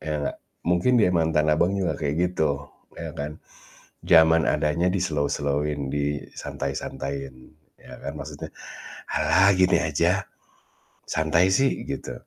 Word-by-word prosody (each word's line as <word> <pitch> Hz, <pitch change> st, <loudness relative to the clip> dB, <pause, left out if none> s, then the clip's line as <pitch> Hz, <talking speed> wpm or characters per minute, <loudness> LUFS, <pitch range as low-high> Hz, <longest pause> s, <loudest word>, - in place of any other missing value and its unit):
ya 75 Hz, -1 st, -3 dB
nggak? -, -, -3 dB, 0.3 s
Mungkin 90 Hz, +8 st, +2 dB
dia 90 Hz, -, +4 dB
mantan 80 Hz, -2 st, +2 dB
Abang 85 Hz, +6 st, +2 dB
juga 95 Hz, -3 st, 0 dB
kayak 75 Hz, -1 st, -1 dB, 0.2 s
gitu, 75 Hz, -4 st, 0 dB, 0.3 s
ya -, -, -6 dB
kan? 75 Hz, +2 st, -5 dB, 0.7 s
Jaman 80 Hz, 0 st, +5 dB
adanya 85 Hz, +4 st, +1 dB
di-slow-slow-in, 75 Hz, -5 st, -1 dB
disantai-santaiin, 70 Hz, -1 st, -4 dB, 0.4 s
ya -, -, -14 dB
kan? 70 Hz, +1 st, -5 dB
Maksudnya, 70 Hz, -, -7 dB, 0.6 s
"Ah 100 Hz, +2 st, +4 dB
gini 95 Hz, -1 st, +4 dB
aja, -, -, +1 dB, 0.9 s
santai 80 Hz, +4 st, +2 dB
sih," 135 Hz, +8 st, +2 dB
gitu, -, -, -4 dB
75 Hz, 115 wpm, -25 LUFS, 70-85 Hz, 0.9 s, Jaman